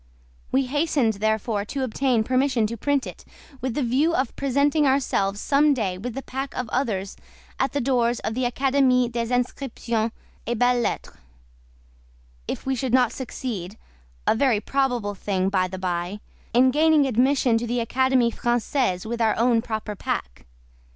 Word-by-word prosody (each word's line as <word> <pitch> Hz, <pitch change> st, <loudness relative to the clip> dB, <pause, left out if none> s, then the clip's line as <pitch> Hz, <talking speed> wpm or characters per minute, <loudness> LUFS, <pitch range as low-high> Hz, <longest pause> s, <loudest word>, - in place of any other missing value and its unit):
We 265 Hz, +1 st, +2 dB
hastened, 285 Hz, -4 st, +1 dB
therefore, 215 Hz, 0 st, -1 dB
to 270 Hz, +5 st, -3 dB
obtain 250 Hz, -1 st, +1 dB
permission 255 Hz, -1 st, +1 dB
to 225 Hz, +2 st, -3 dB
print 280 Hz, +3 st, 0 dB
it, -, -, -9 dB, 0.4 s
with 255 Hz, -2 st, -2 dB
the 290 Hz, -, 0 dB
view 280 Hz, +8 st, +2 dB
of 260 Hz, -2 st, -1 dB
presenting 280 Hz, +2 st, +2 dB
ourselves 205 Hz, -7 st, +1 dB
someday 270 Hz, -11 st, +2 dB
with 240 Hz, +3 st, -5 dB
the 270 Hz, -, -5 dB
pack 270 Hz, +1 st, -5 dB
of 250 Hz, -, -2 dB
others 205 Hz, -7 st, -2 dB, 0.4 s
at 265 Hz, -1 st, 0 dB
the 285 Hz, -, 0 dB
doors 240 Hz, -2 st, +1 dB
of 220 Hz, -, -2 dB
the 255 Hz, +2 st, -1 dB
Académie 260 Hz, -2 st, +2 dB
des 235 Hz, 0 st, -2 dB
Inscriptions 240 Hz, -2 st, -1 dB, 0.4 s
et 240 Hz, 0 st, -1 dB
Belles 245 Hz, +1 st, +3 dB
Lettres, -, -, -3 dB, 1.3 s
if -, -, -4 dB
we 265 Hz, -, 0 dB
should 260 Hz, -1 st, 0 dB
not 250 Hz, -2 st, +3 dB
succeed—a 180 Hz, -, -5 dB
very 240 Hz, -3 st, +2 dB
probable 245 Hz, -3 st, -1 dB
thing, 190 Hz, -1 st, -1 dB
by 185 Hz, -2 st, +1 dB
the 190 Hz, +1 st, -7 dB
by—in 190 Hz, +7 st, -1 dB
gaining 305 Hz, 0 st, +4 dB
admission 255 Hz, -1 st, +2 dB
to 240 Hz, -, -4 dB
the 240 Hz, +1 st, -1 dB
Académie 250 Hz, 0 st, +2 dB
Française 240 Hz, -5 st, 0 dB
with 235 Hz, +1 st, -3 dB
our 220 Hz, -1 st, +2 dB
own 235 Hz, 0 st, +3 dB
proper 220 Hz, -3 st, -4 dB
pack. -, -, -4 dB
245 Hz, 155 wpm, -24 LUFS, 220-265 Hz, 1.3 s, gaining